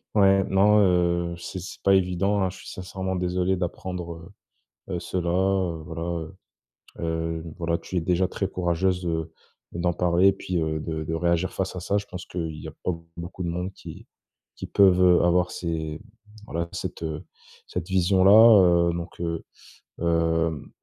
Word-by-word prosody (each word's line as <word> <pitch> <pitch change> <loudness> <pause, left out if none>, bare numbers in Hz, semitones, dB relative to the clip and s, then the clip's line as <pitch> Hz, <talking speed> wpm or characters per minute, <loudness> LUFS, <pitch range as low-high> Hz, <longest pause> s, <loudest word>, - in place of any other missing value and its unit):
Ouais, 95 -1 +5
non, 105 +2 +5
heu, 85 -2 +2
c'est 85 +2 -6
c'est 90 - -9
pas 95 - +5
évident, 95 +2 +1
hein. 95 - +1
Je 95 - -10
suis - - -13
sincèrement 95 0 -4
désolé 90 +1 0
d'apprendre, 90 -1 -5 0.6
heu, 90 -2 -2
cela, 85 -1 -3
heu, 95 -2 +1
voilà 80 0 -6
heu, 85 +1 -4 1.1
hem, 80 -2 -9
voilà, 85 -1 -1
tu 95 - -7
es 85 - +1
déjà 90 +2 +1
très 95 - -2
courageuse 90 0 0
de 80 -1 -2 0.4
d'en 85 0 -1
parler 90 +1 +3
et - - +5
puis, 90 -3 -2
heu, 80 0 -1
de 80 0 -4
de 80 - -3
réagir 85 +2 0
face 95 -1 -2
à 90 - -5
ça. 100 +3 -1
Je 100 - -1
pense 90 -1 -9
que - - -13
il 80 -3 -3
y - - -7
a - - -5
pas - - +1 0.3
beaucoup 85 +2 -7
de - - -2
monde 90 +3 -3
qui - - -11 0.5
qui - - -7
peuvent, 95 -2 +4
heu, 90 -1 +5
avoir 90 0 +3
ces 80 -2 -4 0.4
voilà, 85 -4 -3
cette - - -5 0.6
cette 90 0 -5
vision-là, 95 -1 +6
heu - - -2
donc 85 0 -6
heu, 85 -1 -2 0.6
hem, 80 -2 0
90 Hz, 175 wpm, -25 LUFS, 85-95 Hz, 1.1 s, vision-là